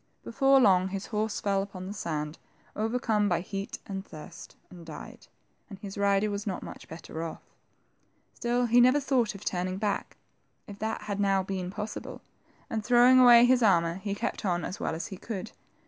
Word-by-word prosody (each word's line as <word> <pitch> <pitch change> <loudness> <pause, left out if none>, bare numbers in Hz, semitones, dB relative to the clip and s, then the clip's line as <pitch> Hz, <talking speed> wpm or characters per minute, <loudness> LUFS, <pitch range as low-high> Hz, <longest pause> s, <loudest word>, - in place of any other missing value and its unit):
Before 270 +3 +4
long, 190 -6 +4
his 190 +1 -5
horse 215 -1 -2
fell 195 -1 +1
upon 195 -2 -7
the 195 - -5
sand, 155 -5 -4 0.4
overcome 220 -1 0
by 175 -2 +1
heat 195 +2 -5
and 195 -1 -5
thirst, 155 -6 -11 0.2
and 175 -2 -11
died, 155 -2 -10 0.4
and 200 - -9
his 195 0 -8
rider 200 +1 +2
was 205 +1 -4
not 190 - -3
much - - -10
better 160 0 -8
off. 165 - -7 0.9
Still 245 0 0
he 240 +1 +5
never 255 +4 +5
thought 255 -6 0
of 200 - -11
turning 185 +1 -2
back, 205 0 -2 0.5
if 205 -1 -11
that 220 +1 -3
had 205 -1 -4
now 195 -1 +2
been 185 -1 -4
possible, 210 +2 -6 0.5
and 220 -1 -3
throwing 245 +2 +6
away 240 -1 +8
his 250 0 +4
armor, 170 -5 +3
he 200 +1 -4
kept - - -3
on 175 -4 0
as 190 - -6
well - - -2
as 165 - -4
he 190 - -7
could. 215 0 -6
200 Hz, 185 wpm, -28 LUFS, 185-225 Hz, 0.9 s, away